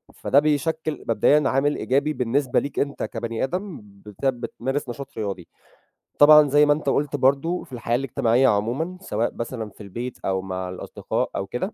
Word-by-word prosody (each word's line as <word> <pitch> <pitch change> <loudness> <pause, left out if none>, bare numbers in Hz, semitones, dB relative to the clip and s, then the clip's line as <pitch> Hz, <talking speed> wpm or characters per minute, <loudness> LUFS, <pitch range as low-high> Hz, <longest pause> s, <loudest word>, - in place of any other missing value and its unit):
فده 135 - +3
بيشكِّل 155 +1 -1
مبدئيًا 150 +1 +4
عامل 140 +2 +1
إيجابي 140 +4 0
بالنسبة 130 +1 +1
ليك 140 - -4
أنت 140 0 -2
كبني 115 -1 -3
آدم 180 - -4
بت 105 +3 -11
بتمارس 135 +1 -3
نشاط 135 +3 -6
رياضي. 100 -5 -4 0.7
طبعًا 150 0 +8
زي 145 +2 +5
ما 145 - +5
أنت 145 -1 -2
قُلت 145 +1 0
برضه 140 +6 +1
في 135 - -16
الحياة 120 -1 -1
الاجتماعية 125 -1 +2
عمومًا 125 - 0
سواء 115 - -2
مثلًا 115 -2 -5
في 105 - -13
البيت 120 +5 -6
أو 95 -1 0
مع 95 -1 -5
الأصدقاء 90 - -3
أو 95 - -3
كده، 125 - -4
130 Hz, 170 wpm, -23 LUFS, 115-145 Hz, 0.7 s, طبعًا